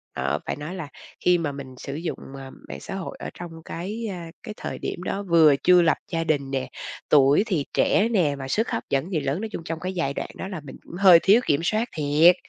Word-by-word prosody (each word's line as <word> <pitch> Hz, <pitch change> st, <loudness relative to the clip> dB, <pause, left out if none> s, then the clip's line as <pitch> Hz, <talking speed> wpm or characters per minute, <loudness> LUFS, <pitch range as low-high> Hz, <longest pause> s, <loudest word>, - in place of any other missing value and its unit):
Ờ, -, -, -1 dB
phải -, -, -2 dB
nói 150 Hz, +6 st, -6 dB
là 160 Hz, -6 st, -5 dB, 0.4 s
khi 180 Hz, 0 st, +6 dB
mà 160 Hz, -4 st, -2 dB
mình 135 Hz, -2 st, -9 dB
sử 140 Hz, +2 st, -6 dB
dụng, 165 Hz, +3 st, -4 dB, 0.2 s
ờ, 135 Hz, -1 st, -8 dB, 0.2 s
mạng -, -, -6 dB
xã -, -, -7 dB
hội 190 Hz, -3 st, -5 dB
ở -, -, -5 dB
trong 175 Hz, -1 st, -8 dB
cái, 210 Hz, +7 st, -5 dB
ơ, -, -, -5 dB, 0.3 s
cái 215 Hz, -, -6 dB
thời -, -, -5 dB
điểm 175 Hz, -, -4 dB
đó 200 Hz, +2 st, -2 dB
vừa 165 Hz, -6 st, +6 dB
chưa 180 Hz, -1 st, +7 dB
lập 165 Hz, -, +3 dB
gia 165 Hz, -1 st, 0 dB
đình 140 Hz, -4 st, 0 dB
nè, 130 Hz, -1 st, -2 dB, 0.4 s
tuổi 145 Hz, +4 st, +5 dB
thì 160 Hz, -9 st, 0 dB
trẻ 220 Hz, +3 st, +3 dB
nè, 165 Hz, -9 st, +2 dB
mà 135 Hz, -, -5 dB
sức 220 Hz, -, 0 dB
hấp -, -, -2 dB
dẫn 140 Hz, +6 st, 0 dB
thì 160 Hz, -, +1 dB
lớn, 145 Hz, +5 st, -2 dB
nói 225 Hz, -, -4 dB
chung 170 Hz, -, -5 dB
trong 165 Hz, 0 st, -4 dB
cái 185 Hz, +3 st, -4 dB
giai 165 Hz, -7 st, -1 dB
đoạn -, -, -4 dB
đó -, -, -5 dB
là 185 Hz, -6 st, -6 dB
mình 140 Hz, -, -10 dB
cũng -, -, -11 dB
hơi 185 Hz, -3 st, +8 dB
thiếu 210 Hz, +5 st, +6 dB
kiểm 145 Hz, +2 st, +2 dB
soát 220 Hz, +6 st, 0 dB
thiệt. 155 Hz, +4 st, +5 dB
165 Hz, 250 wpm, -24 LUFS, 145-185 Hz, 0.4 s, hơi